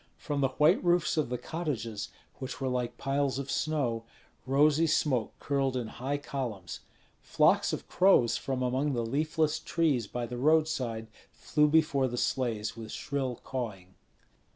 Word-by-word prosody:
From 145 -3 -3
the 135 - +4
white 150 - +3
roofs 175 -2 +2
of 155 -6 0
the 125 - -2
cottages, 115 -11 -4 0.3
which 130 -1 -6
were 135 - -1
like 125 -1 -2
piles 135 -1 0
of 140 0 -4
snow, 135 -8 -1 0.4
rosy 150 +4 +4
smoke 130 -7 +1
curled 135 -2 0
in 120 - -2
high 130 +6 -3
columns. 120 -11 -5 0.4
Flocks - - +3
of - - -5
crows 180 -11 +4
from 130 -2 -2
among 130 +3 0
the 120 -2 -1
leafless 155 +4 0
trees 145 -10 0
by 120 +2 -3
the 120 +1 -6
roadside 145 -6 +1 0.3
flew 150 -1 +1
before 150 -3 +3
the 120 -1 -4
sleighs 115 -4 -1
with 110 -1 -8
shrill 135 -4 -3
cawing. 105 -8 -5
135 Hz, 150 wpm, -30 LUFS, 120-150 Hz, 0.4 s, the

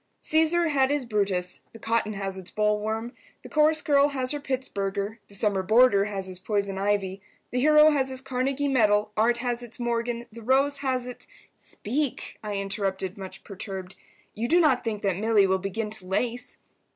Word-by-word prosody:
"Caesar 320 +2 +2
had 270 -3 +3
his 285 -2 0
Brutus—the 200 -2 -2
cotton 225 -1 0
has 195 -1 -4
its 190 -1 -7
bollworm, 215 +2 -1 0.3
the - - -10
chorus 310 +1 +3
girl 285 -1 +4
has 260 -3 -1
her 295 - -2
Pittsburger, 215 -6 -3
the 200 - -9
summer 200 -1 +1
boarder 215 0 +5
has 200 -2 -4
his 185 -1 -6
poison 200 -1 -1
ivy, 195 -1 -1 0.3
the 250 - 0
hero 305 +2 +6
has 270 -3 +1
his 260 -1 -2
Carnegie 270 +2 -1
medal, 210 -5 +3
art 235 +2 +3
has 240 -1 -1
its 240 -1 -7
Morgan, 235 0 -2
the 230 +1 -11
rose 275 +4 +2
has 260 -3 -1
its—" 250 -1 -9 0.3
"Speak," 270 +5 -4
I 210 -1 -3
interrupted, 195 -1 -2
much 190 -2 -8
perturbed. 190 -2 -7 0.4
"You 230 +3 -2
do 345 +7 +4
not 295 -7 +3
think 215 -3 -3
that 195 -3 +1
Milly 215 -1 +3
will 190 0 +1
begin 210 +3 -3
to 215 -4 -8
lace?" 240 +5 -1
225 Hz, 175 wpm, -26 LUFS, 200-260 Hz, 0.4 s, hero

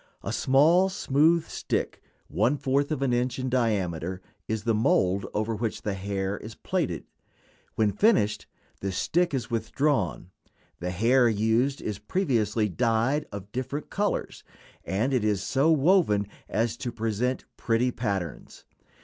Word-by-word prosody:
A - - -3
small 160 +8 +4
smooth 165 -2 +2
stick, - - -3 0.3
one 115 - +1
fourth 140 +2 0
of 140 -3 -1
an 130 -3 +1
inch 125 +1 0
in 130 0 -2
diameter, 95 -8 0 0.3
is 110 -2 -2
the 115 - +1
mold 100 -4 +2
over 110 +2 -1
which 110 0 -3
the 105 - -1
hair 95 0 -3
is 110 +1 -9
plaited. 160 - -2 0.7
When 110 -2 +2
finished, 105 - +2 0.3
the 95 - -3
stick 175 - +1
is 125 -5 -3
withdrawn. 115 - -1 0.5
The 90 - -3
hair 120 +7 +3
used 115 +6 +1
is 105 -2 -3
previously 115 - 0
dyed 115 - +1
of 100 0 -8
different 130 +4 -4
colors, 205 +1 -2 0.4
and 110 +8 -1
it 125 -4 +2
is 105 -3 +1
so 140 +4 +2
woven 155 - +3 0.2
as 115 +1 0
to 120 -1 -4
present 115 +3 -2
pretty 120 +2 +1
patterns. 100 - -4
115 Hz, 140 wpm, -27 LUFS, 105-135 Hz, 0.7 s, small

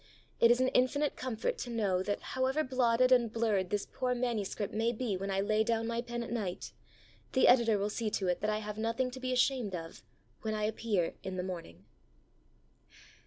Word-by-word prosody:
It 235 - +6
is 240 +1 +5
an 255 0 +3
infinite 275 +3 +2
comfort 240 -4 -3
to 245 - -4
know 205 -6 0
that, 205 +2 -2
however 265 +4 +1
blotted 255 -1 +2
and 240 -3 +4
blurred 215 -5 0
this 205 -1 -1
poor 255 -1 -2
manuscript 225 -4 -2
may 225 +2 +1
be 235 -3 -2
when 195 +2 -4
I 195 0 +1
lay 215 +2 +2
down 225 0 0
my 235 +1 -1
pen 240 0 -4
at 235 - -8
night, 205 -7 -3 0.6
the 260 - +5
Editor 235 -4 +5
will 205 +1 -1
see 225 0 -2
to 195 -2 -1
it 180 -1 0
that 215 - 0
I 215 - +1
have 210 0 -5
nothing 230 +3 0
to 260 - -8
be 255 0 -2
ashamed 250 -5 +1
of 165 -1 -8 0.4
when 215 -1 -2
I 215 - -2
appear 210 -5 0
in 190 -1 -5
the 180 - -1
morning. 165 - -7
225 Hz, 205 wpm, -32 LUFS, 205-250 Hz, 0.6 s, It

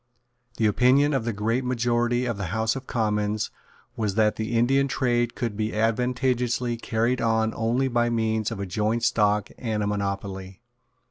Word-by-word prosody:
The 110 - +1
opinion 130 +7 +4
of 130 -5 0
the 120 - 0
great 115 +5 -1
majority 120 0 0
of 120 -2 -1
the 100 -1 -4
House 110 +6 0
of 135 -1 -7
Commons 105 -2 -1 0.4
was 105 -3 -2
that 110 -1 +3
the 110 +1 -2
Indian 135 +4 +3
trade 120 -2 0
could 115 -4 -3
be 110 +1 -2
advantageously 125 +1 0
carried 115 +2 0
on 110 -1 +1
only 120 +4 +1
by 120 -1 +1
means 110 -2 0
of - - -6
a 100 - -2
joint 110 +5 -1
stock 105 -1 +2
and 110 -4 -2
a - - -1
monopoly. 100 -2 -4
115 Hz, 170 wpm, -25 LUFS, 105-120 Hz, 0.4 s, opinion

